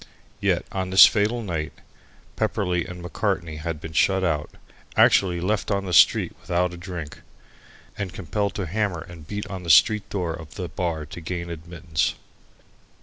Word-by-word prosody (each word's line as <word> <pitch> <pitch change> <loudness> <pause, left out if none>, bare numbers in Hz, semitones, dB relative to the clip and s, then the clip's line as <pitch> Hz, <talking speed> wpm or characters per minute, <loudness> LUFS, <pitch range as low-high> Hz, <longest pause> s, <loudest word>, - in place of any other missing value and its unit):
Yet - - +1
on 95 -1 -2
this 95 +1 +10
fatal 110 +3 +1
night 80 -6 -3 0.6
Pepperleigh 90 -2 -1
and 90 -1 -8
Macartney 90 -3 -2
had 80 0 -4
been 80 +1 -8
shut 95 +3 +3
out 75 -4 0 0.5
actually 90 -3 +5
left 100 +4 -1
on 100 -1 0
the 90 - -4
street - - +5
without 90 0 0
a - - -6
drink, 85 -4 -7 0.8
and 95 -3 -3
compelled 100 +4 -2
to 100 - -2
hammer 95 -1 -1
and 85 -3 -12
beat 105 +2 -4
at 95 -2 -7
the 85 - -6
street 105 +6 +5
door 90 -4 -2
of 80 -2 -10
the 90 -2 -5
bar 85 -4 -3
to 80 +4 -9
gain 85 +1 -4
admittance. 85 -1 -2
90 Hz, 165 wpm, -24 LUFS, 80-95 Hz, 0.8 s, this